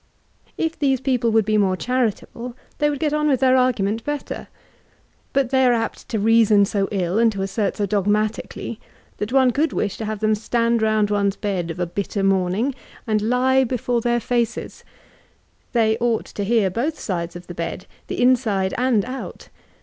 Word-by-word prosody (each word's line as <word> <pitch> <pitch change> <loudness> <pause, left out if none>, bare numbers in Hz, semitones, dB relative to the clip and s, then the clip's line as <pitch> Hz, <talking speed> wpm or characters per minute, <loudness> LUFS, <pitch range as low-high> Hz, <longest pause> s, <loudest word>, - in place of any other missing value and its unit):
If 325 0 -2
these 270 -3 +2
people 250 -3 +1
would 220 -2 +3
be 215 0 +2
move 190 -2 +2
diaritable, 240 +1 -2 0.2
they 295 - +3
would 290 - -2
get 300 +1 -1
on 300 0 +1
with 270 -4 +2
their 260 -1 +4
argument 225 -4 +1
better. 295 -1 -4 0.8
But 270 -3 +1
they 265 -1 +4
are 250 -1 +5
apt 225 -1 -3
to 225 - -1
reason 215 -1 +4
so 200 -1 -1
ill, 190 0 0
and 230 -1 +4
to 195 -1 -3
assert 195 +1 -1
so 205 - 0
dog 200 0 0
matically, 215 +1 -1 0.4
that 210 +2 -4
one 260 -1 +4
could 305 +6 0
wish 200 - -1
to 220 - -4
have 215 -1 -3
them 215 +1 +2
stand 230 +2 +1
round 215 -1 +2
one's 200 -1 +1
bed 190 -5 -2
of 165 +2 -6
a 175 - +1
bitter 200 +3 -3
morning, 195 +7 +1 0.3
and 215 -2 +1
lie 255 +4 +3
before 245 -1 -1
their 240 +1 +1
&ces. 235 -1 -2 0.9
They 220 -2 +2
oi^ht 235 -1 -1
to 205 - -3
hear 205 -2 +2
both 275 - -2
sides 175 -3 -3
of 175 0 -9
the 175 - -8
bed, 170 +2 -5 0.2
the - - -4
Inside 230 -7 +2
and 245 -5 +2
out. 260 +2 -7
225 Hz, 190 wpm, -22 LUFS, 200-250 Hz, 0.9 s, are